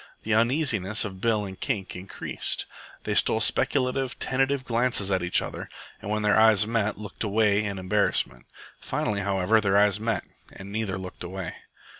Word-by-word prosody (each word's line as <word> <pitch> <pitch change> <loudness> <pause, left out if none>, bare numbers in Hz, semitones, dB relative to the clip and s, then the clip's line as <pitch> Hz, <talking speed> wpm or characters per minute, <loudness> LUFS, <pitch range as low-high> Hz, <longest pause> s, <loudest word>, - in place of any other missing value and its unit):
The 110 - 0
uneasiness 115 - +1
of 95 -2 -7
Bill 110 -2 +1
and 95 -1 -9
Kink 95 -2 -3
increased. 90 +2 -4 0.4
They - - -2
stole - - +3
speculative, 130 -1 +1
tentative 135 +1 0
glances 115 -5 +2
at 95 -1 +1
each 90 0 +2
other, - - -7 0.3
and 100 - -7
when 105 0 -1
their 105 +1 +4
eyes 110 -3 +5
met 110 -2 -1
looked 105 0 -6
away 105 0 +2
in 100 -2 -3
embarrassment. 95 -10 0 0.3
Finally, 105 -1 -2
however, 100 +2 +2
their 100 -1 +2
eyes 105 0 +4
met 115 0 -1 0.3
and 95 +1 -10
neither 105 -3 -2
looked 95 -1 -8
away. 95 0 -5
105 Hz, 165 wpm, -26 LUFS, 95-115 Hz, 0.4 s, eyes